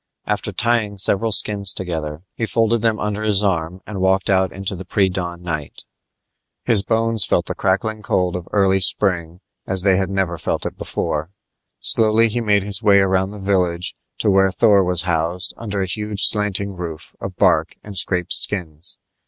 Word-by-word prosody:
After - - -2
tying 115 -4 0
several 100 +3 +1
skins 100 -2 +3
together, 80 -3 -4
he 115 - -3
folded 115 0 +1
them 110 -1 +1
under 105 0 -3
his 105 -2 +1
arm 90 -2 -1
and 100 -3 -6
walked 95 +1 +1
out 95 -1 +2
into 95 +1 -5
the 95 - -8
pre 95 +1 +1
dawn 90 -1 -5
night. 80 -4 -5 0.8
His 115 -5 +4
bones 115 0 +2
felt - - +1
the - - -3
crackling 105 +3 -1
cold 90 -3 0
of 90 0 -6
early 95 -1 +2
spring 90 -2 +1 0.3
as 95 -1 +1
they 95 -2 +3
had 95 -1 -1
never 95 -4 -2
felt - - -2
it - - -4
before. 75 +2 -3 0.5
Slowly 115 +1 +4
he 120 +2 -2
made 105 -3 +2
his 100 +1 -7
way 105 -3 +5
around 95 -1 +2
the 105 - -9
village 90 -3 -1 0.2
to 105 - +1
where 95 0 +4
Thor 100 0 +4
was 90 -1 +1
housed 85 +1 0
under 100 -4 -4
a - - -1
huge 105 +2 -2
slanting 100 -2 +2
roof 85 -3 -8
of - - -6
bark - - +2
and 105 -1 -10
scraped 90 -2 -1
skins. 85 -4 0
95 Hz, 180 wpm, -20 LUFS, 90-105 Hz, 0.8 s, way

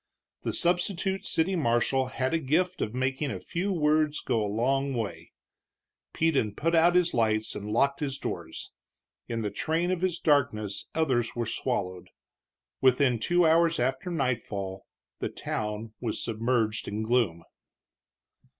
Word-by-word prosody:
The - - -2
substitute 190 +2 0
city 185 +4 +1
marshal 130 -2 +2
had 130 +2 -2
a 165 - +2
gift 175 +6 0
of 110 - -2
making 130 +3 -1
a - - -4
few 185 +4 -2
words 155 -3 +2
go 110 -2 0
a 105 - -2
long 135 +5 +1
way; 110 -5 -4 0.8
Peden 140 -11 +1
put 165 +2 0
out 170 +1 +5
his 180 -1 +3
lights 110 -2 +1
and 105 +1 -6
locked 140 +6 +2
his 140 -3 -2
doors. - - -6 0.6
In 115 -1 -2
the 105 - -2
train 165 +3 0
of 180 -2 -1
his 185 -2 0
darkness 115 - +1
others 130 -8 +1
were 120 -1 -1
swallowed. 90 -4 -3 0.7
Within 130 -2 +4
two 175 +9 +3
hours 165 +1 +4
after 130 +7 -1
nightfall 110 - -2 0.3
the - - -2
town 105 +1 -4
was 115 -3 -3
submerged 115 -1 0
in 105 +2 -2
gloom. 110 -8 +1
130 Hz, 145 wpm, -28 LUFS, 110-165 Hz, 0.8 s, out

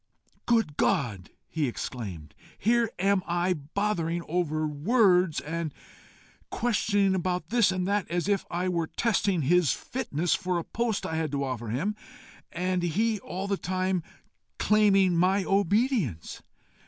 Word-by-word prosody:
"Good 225 -11 +2
God!" 120 - 0 0.2
he 155 -3 -1
exclaimed, 95 - -6 0.2
"here 235 +1 +2
am 195 +1 +2
I 175 +1 +1
bothering 170 +1 -2
over 155 -2 0
words, 180 - +3
and 165 0 -4 0.8
questioning 205 -4 +1
about 180 -2 -2
this 230 -4 +3
and 185 -1 -2
that, 205 -1 0
as 175 +1 -1
if 200 -2 +1
I 180 +2 -1
were 170 -3 0
testing 200 -6 0
his 175 +2 +3
fitness 180 - -2
for 180 -1 -1
a 170 - -2
post 230 0 -2
I 160 - -2
had 160 -3 -1
to 140 0 0
offer 125 -4 -4
him, 160 - -1 0.6
and 180 +1 -1
he 210 +6 0
all 190 +1 -5
the 200 -1 0
time 185 -1 -1 0.6
claiming 195 -4 +4
my 185 +3 +3
obedience! 200 - 0
180 Hz, 140 wpm, -27 LUFS, 160-200 Hz, 0.8 s, claiming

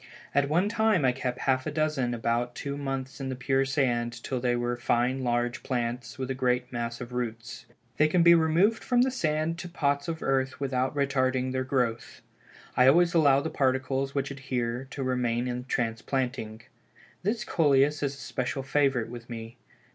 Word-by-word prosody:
At 140 0 +2
one 175 +6 +2
time 220 -7 +2
I 130 - +5
kept 125 -1 -4
half 130 0 +1
a - - -2
dozen 145 -5 0
about 120 +1 -1
two 140 0 -4
months 135 -1 -4
in 135 - -3
the 130 - -3
pure 135 +1 +1
sand, 120 -4 -1
till 130 - -2
they 120 0 +1
were 120 0 -1
fine 125 +2 0
large 120 0 0
plants, 120 0 -3
with 130 -1 -3
a - - +1
great 125 -1 0
mass 115 0 -3
of 125 0 -7
roots. 115 -1 -5 0.3
They 155 - +5
can 170 +2 +3
be 170 0 +8
removed 170 +7 +3
from 245 -1 +3
the 260 - +1
sand 160 -6 -1
to 175 - -6
pots 140 -4 0
of 160 -1 -4
earth 130 -1 0
without 130 -1 -1
retarding 130 -2 +1
their 130 0 -1
growth. 125 -3 -2 0.5
I 125 - +5
always 170 +5 +5
allow 140 -5 +5
the 160 - -4
particles 135 +1 0
which 135 0 -1
adhere 130 -2 -3
to 140 - -5
remain 125 -1 0
in 125 0 -4
transplanting. 115 -1 -2 0.6
This 215 +3 -1
Coleus 145 -4 +3
is 140 -1 -1
a - - -14
special 135 0 -3
favorite 135 -4 +1
with 120 0 -9
me. 115 0 -7
130 Hz, 185 wpm, -28 LUFS, 120-145 Hz, 0.6 s, be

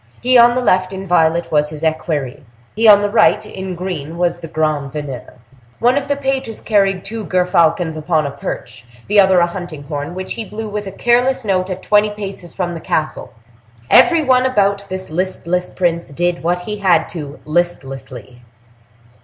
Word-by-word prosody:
He 255 +1 +2
on 240 0 +7
the 255 - +1
left, 185 -3 +2
in 190 0 -6
violet, 170 -1 +2
was 150 -1 +2
his 155 0 -9
equerry; 155 -3 -2 0.3
he 225 +2 +3
on 205 -1 +8
the 205 - +1
right, 215 -1 +3
in 190 -3 -6
green, 170 -3 -5
was 175 -1 0
the 165 - -8
grand 155 -3 -1
veneur. 135 -7 -7 0.4
One 245 +2 +3
of 280 -1 -1
the 285 - +1
pages 265 -4 -3
carried 195 -3 +1
two 220 +2 -5
gerfalcons 170 -3 +1
upon 155 0 0
a 140 - -3
perch, 120 -3 -7 0.2
the 205 +1 +3
other 190 -2 +5
a - - +4
hunting 175 -4 -7
horn, 145 +3 -5
which 185 0 -4
he 230 - -4
blew 215 +1 -6
with 210 -1 -4
a - - -5
careless 245 +4 +1
note 185 -2 0
at 185 0 -5
twenty 210 0 +3
paces 195 -4 -7
from 175 -1 -3
the 165 - -6
castle. 155 0 -2 0.6
Every 335 -2 +6
one 260 -2 +3
about 200 -4 +1
this 185 -2 -5
listless 180 0 -2
prince 170 -3 -1
did 175 +4 -1
what 175 +2 0
he 210 +4 -5
had 180 -5 +2
to 150 -4 -7
listlessly. 135 -7 -3
180 Hz, 185 wpm, -17 LUFS, 160-210 Hz, 0.6 s, on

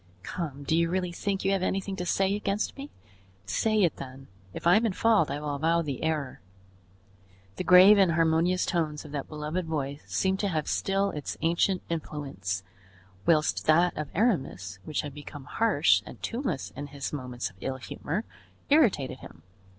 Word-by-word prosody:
Come, 145 -5 -5
do 155 - +1
you 170 0 +2
really 180 0 -1
think 195 +2 -2
you 195 - +3
have 195 -1 +1
anything 195 +1 -1
to 180 - -3
say 195 +2 +2
against 205 0 -1
me? 280 +1 -8 0.6
Say 215 - +2
it 170 - +1
then; 135 0 -9 0.2
if - - -8
I 175 +2 +7
am 220 - +3
in 220 -4 +1
fault 220 -6 +3
I 140 +1 -3
will 150 -1 -3
avow 165 +4 +1
the 140 -4 -4
error." 155 -4 -2 1.2
The - - -2
grave 190 +3 +8
and 185 -4 +4
harmonious 165 +3 +2
tones 155 -3 -1
of 150 - -10
that 145 -2 -4
beloved 155 +3 -4
voice 145 -2 -3
seemed 190 0 0
to 205 - 0
have 155 -5 -1
still 195 +1 0
its 150 -2 -5
ancient 170 +3 +2
influence, 135 - -4 0.6
whilst 155 -2 +2
that 170 +3 +4
of 150 -2 -4
Aramis, 135 - 0
which 155 - -1
had 145 -2 -7
become 145 -1 -9
harsh 190 -3 +3
and - - -11
tuneless 230 - -3
in 145 - -5
his 140 0 -5
moments 125 -6 -4
of 90 - -26
ill 135 0 -3
humor, 160 - -4 0.5
irritated 185 - +3
him. - - -13
165 Hz, 180 wpm, -28 LUFS, 145-190 Hz, 1.2 s, grave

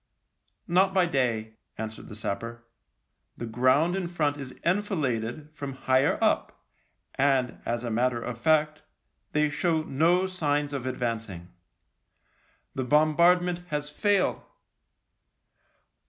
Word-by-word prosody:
" - - -53 0.3
Not 190 +2 +3
by 185 -2 +5
day," 115 -8 -1 0.2
answered 110 0 -6
the 105 - -8
sapper. 115 +3 -5 0.3
" - - -49
The 120 - -5
ground 130 +9 +2
in 190 -2 -2
front 155 -4 0
is 135 -3 -9
enfiladed 155 - -1
from 140 -3 -6
higher 130 +1 +2
up, - - 0 0.5
and, 135 -2 +1
as 120 0 -1
a 120 - -3
matter 120 +1 +1
of 120 0 -6
fact, 155 +1 +2 0.5
they 150 0 +3
show 160 +2 0
no 165 +6 +2
signs 150 -6 -1
of 130 -2 -3
advancing. 115 -8 -4 1.2
The 130 - -2
bombardment 170 +5 +3
has 150 -2 -3
failed." 200 +4 +1
145 Hz, 125 wpm, -27 LUFS, 120-165 Hz, 1.2 s, by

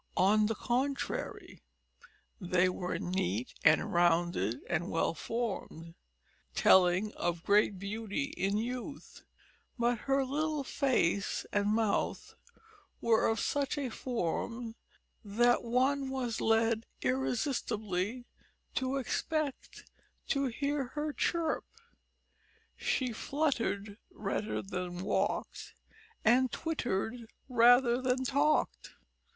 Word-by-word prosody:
On 210 +3 +4
the 225 - -1
contrary, 265 +5 -2 0.8
they 185 -1 +2
were 180 0 -3
neat 125 - -2
and 155 0 +4
rounded 170 - +2
and 175 0 -1
well 165 - +1
formed, 190 -7 -4 0.6
telling 190 +3 +5
of 175 -1 -2
great 205 -1 +3
beauty 215 +8 -3
in 195 +2 0
youth, 250 +5 -5 0.6
but 240 -1 +1
her 270 0 +3
little 300 +2 -1
face 255 - 0
and 205 0 +2
mouth 215 -1 0 0.7
were 230 -1 +3
of 225 -1 +1
such 285 +4 0
a 275 -3 -2
form 230 +1 -3 0.5
that 240 +4 +3
one 265 +3 +1
was 250 -4 -2
led 225 0 +2 0.2
irresistibly 240 -5 -1 0.5
to 260 +1 -1
expect 285 +2 -2 0.4
to 275 -1 +1
hear 280 +3 -1
her 300 0 -2
chirp; 330 0 0 1.1
she 255 -3 -1
fluttered 230 -7 -1
rather 210 +1 -3
than 180 -2 -4
walked 195 - -2 0.5
and 250 +3 +4
twittered 240 - -2 0.2
rather 245 0 +5
than 255 0 +1
talked. 285 +4 +1
230 Hz, 100 wpm, -32 LUFS, 195-265 Hz, 1.1 s, telling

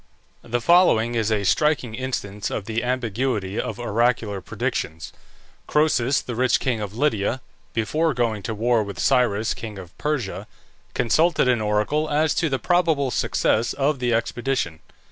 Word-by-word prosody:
The 120 +1 -2
following 120 -8 +4
is 115 -2 0
a 105 -2 +1
striking 135 +1 +1
instance 105 -5 -4
of 100 - -4
the 115 +1 -2
ambiguity 120 -4 -1
of - - -5
oracular 115 -3 0
predictions: 80 -2 -4 0.5
Croesus, 140 -4 +2
the 125 - -5
rich 125 +2 +2
king 125 -5 -1
of 105 +1 -6
Lydia, 120 -3 +1 0.3
before 150 +7 0
going 115 -4 0
to 110 +4 -4
war 115 +1 +2
with 100 -3 -6
Cyrus, 115 -4 +2
king 110 -3 -8
of 90 -2 -11
Persia, 105 -10 -2 0.5
consulted 155 +6 +2
an 125 -3 +2
oracle 105 +9 0
as 150 +1 +2
to 165 - 0
the 135 - 0
probable 160 -5 +1
success 115 -1 +1
of 140 0 0
the 125 -1 0
expedition. 115 -6 -1
120 Hz, 150 wpm, -23 LUFS, 105-135 Hz, 0.5 s, following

